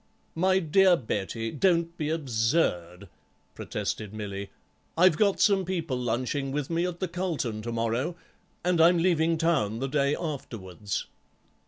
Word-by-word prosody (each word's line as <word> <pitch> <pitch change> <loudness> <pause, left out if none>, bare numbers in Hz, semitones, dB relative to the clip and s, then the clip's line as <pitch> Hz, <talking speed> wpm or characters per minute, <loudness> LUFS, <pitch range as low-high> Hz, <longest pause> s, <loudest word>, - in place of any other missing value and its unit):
"My 185 +3 +2
dear 185 +1 +4
Betty, 115 -1 -3
don't 170 +1 +1
be 155 -3 -3
absurd," 115 - 0 0.5
protested 105 -1 -4
Milly; 100 -2 -5 0.5
"I've 180 -1 +6
got 200 +2 +2
some 200 -2 +4
people 170 -7 -2
lunching 125 +3 -2
with 145 +2 -3
me 170 +2 +1
at 175 -1 -6
the 185 - -1
Carlton 165 - -3
to 120 +2 -5
morrow, 115 +8 -1 0.5
and 180 -2 +3
I'm 170 +2 +6
leaving 165 -1 +2
Town 155 -11 +1
the 135 +3 -2
day 140 +1 +1
afterwards." 105 - -5
150 Hz, 140 wpm, -27 LUFS, 115-170 Hz, 0.5 s, I've